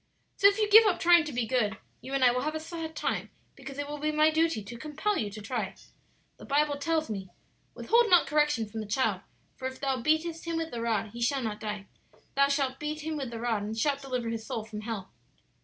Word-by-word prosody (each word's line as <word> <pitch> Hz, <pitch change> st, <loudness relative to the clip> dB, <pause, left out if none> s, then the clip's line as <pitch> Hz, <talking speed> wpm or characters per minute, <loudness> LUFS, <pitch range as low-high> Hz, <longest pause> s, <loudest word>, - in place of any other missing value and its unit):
"So 400 Hz, -, +6 dB
if 400 Hz, 0 st, +3 dB
you 425 Hz, -1 st, +2 dB
give 440 Hz, +2 st, +9 dB
up 380 Hz, -, +1 dB
trying 345 Hz, -2 st, +6 dB
to 300 Hz, -, -5 dB
be 245 Hz, -3 st, -1 dB
good 220 Hz, -3 st, 0 dB, 0.2 s
you 270 Hz, +1 st, -5 dB
and 270 Hz, -, +2 dB
I 250 Hz, -, +7 dB
will 250 Hz, +1 st, -1 dB
have 305 Hz, +3 st, -2 dB
a -, -, -1 dB
sad 320 Hz, 0 st, -6 dB
time; -, -, -2 dB, 0.2 s
because 270 Hz, 0 st, -10 dB
it 285 Hz, 0 st, -3 dB
will 295 Hz, 0 st, -5 dB
be 305 Hz, +1 st, 0 dB
my 305 Hz, +1 st, +4 dB
duty 320 Hz, -8 st, +1 dB
to 220 Hz, +4 st, -9 dB
compel 310 Hz, -, -1 dB
you 215 Hz, -, -1 dB
to 210 Hz, +1 st, -9 dB
try. 220 Hz, -4 st, -3 dB, 0.6 s
The -, -, -13 dB
Bible 290 Hz, 0 st, +1 dB
tells 315 Hz, +2 st, 0 dB
me, 195 Hz, -4 st, -5 dB, 0.5 s
'Withhold 470 Hz, 0 st, +3 dB
not 355 Hz, -1 st, +6 dB
correction 295 Hz, -7 st, +1 dB
from 220 Hz, +2 st, -6 dB
the 215 Hz, -, -5 dB
child; 210 Hz, -3 st, 0 dB, 0.4 s
for 260 Hz, -, -3 dB
if 260 Hz, 0 st, -8 dB
thou 265 Hz, -3 st, -1 dB
beatest 320 Hz, +4 st, 0 dB
him 335 Hz, -1 st, -2 dB
with 325 Hz, 0 st, -3 dB
the 235 Hz, -, -4 dB
rod 225 Hz, -2 st, -1 dB
he 235 Hz, -, -8 dB
shall 265 Hz, +2 st, +1 dB
not 215 Hz, -2 st, -3 dB
die. 210 Hz, -2 st, -5 dB, 0.5 s
Thou 280 Hz, 0 st, +4 dB
shalt 275 Hz, -2 st, 0 dB
beat 305 Hz, +1 st, -4 dB
him 315 Hz, +1 st, -3 dB
with 275 Hz, -4 st, -3 dB
the 230 Hz, -1 st, -6 dB
rod, 230 Hz, -3 st, 0 dB
and 215 Hz, +2 st, -4 dB
shalt 280 Hz, +3 st, +1 dB
deliver 250 Hz, -4 st, -3 dB
his 225 Hz, -1 st, -4 dB
soul 220 Hz, 0 st, -4 dB
from 215 Hz, -1 st, -7 dB
hell.' 215 Hz, -4 st, -5 dB
270 Hz, 245 wpm, -29 LUFS, 225-310 Hz, 0.6 s, give